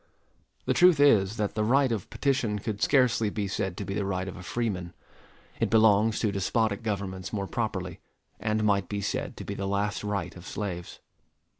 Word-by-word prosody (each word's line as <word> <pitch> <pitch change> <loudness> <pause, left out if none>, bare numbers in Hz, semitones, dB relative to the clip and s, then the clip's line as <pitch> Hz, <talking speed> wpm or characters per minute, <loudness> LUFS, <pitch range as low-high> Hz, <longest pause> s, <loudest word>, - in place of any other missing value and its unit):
The - - +2
truth 180 -4 +6
is, 110 -7 +4
that 105 -1 -1
the 110 - 0
right 130 +3 +3
of 110 -5 -3
petition 125 -7 0
could 105 0 -4
scarcely 125 -6 +3
be 105 -1 -3
said 95 -2 -3
to 100 - -4
be 95 - -4
the 105 - -1
right 95 -1 -2
of 95 - -6
a 90 - -9
freeman. 95 -4 -3 0.7
It - - +1
belongs 110 0 +4
to 110 - +1
despotic 100 +2 0
governments 95 -4 -4
more 100 -2 -2
properly, 95 -5 -3 0.4
and 110 +1 0
might 100 -3 +2
be 100 -1 -2
said - - -3
to - - -6
be - - -4
the 95 - -3
last 100 +1 -1
right 100 -4 -3
of 90 0 -11
slaves. 90 -5 -5
105 Hz, 190 wpm, -28 LUFS, 95-110 Hz, 0.7 s, truth